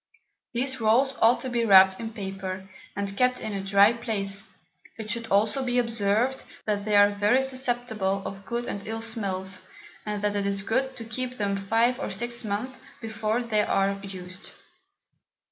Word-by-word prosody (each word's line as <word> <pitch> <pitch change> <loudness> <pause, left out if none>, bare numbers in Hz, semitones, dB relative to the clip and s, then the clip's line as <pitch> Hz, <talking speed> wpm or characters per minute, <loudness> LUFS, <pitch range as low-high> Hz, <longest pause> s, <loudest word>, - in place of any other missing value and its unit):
These 260 +1 0
Rolls 255 +5 +3
ought 230 +2 +5
to 260 - -3
be 240 -1 +1
wrapped 190 -3 +7
in 225 -1 -5
Paper, 190 -3 -6 0.3
and 200 0 -3
kept 250 +2 +2
in 215 - -5
a 195 -1 -3
dry 200 +3 +5
Place: 210 -3 -3 0.5
it 215 -2 -4
should 230 +1 -2
also 215 +6 +2
be 250 -1 0
observed, 230 +2 +1 0.2
that 205 -1 -1
they 210 -1 +1
are 205 0 +7
very 210 +6 +2
susceptible 240 -7 -1
of 195 0 -6
good 235 +2 -2
and 200 -3 -5
ill 225 +1 -4
Smells, 195 -4 -2 0.4
and 210 -1 -4
that 205 0 0
it 200 -1 0
is 200 -1 -2
good 260 +5 -1
to 230 - -7
keep 250 +3 -4
them 200 -2 0
5 225 +6 +1
or - - -3
6 235 +4 -3
Months 215 +6 -3 0.2
before 220 +1 -2
they 215 -3 +1
are 195 -1 +2
used. 185 -1 -8
215 Hz, 175 wpm, -26 LUFS, 200-240 Hz, 0.5 s, wrapped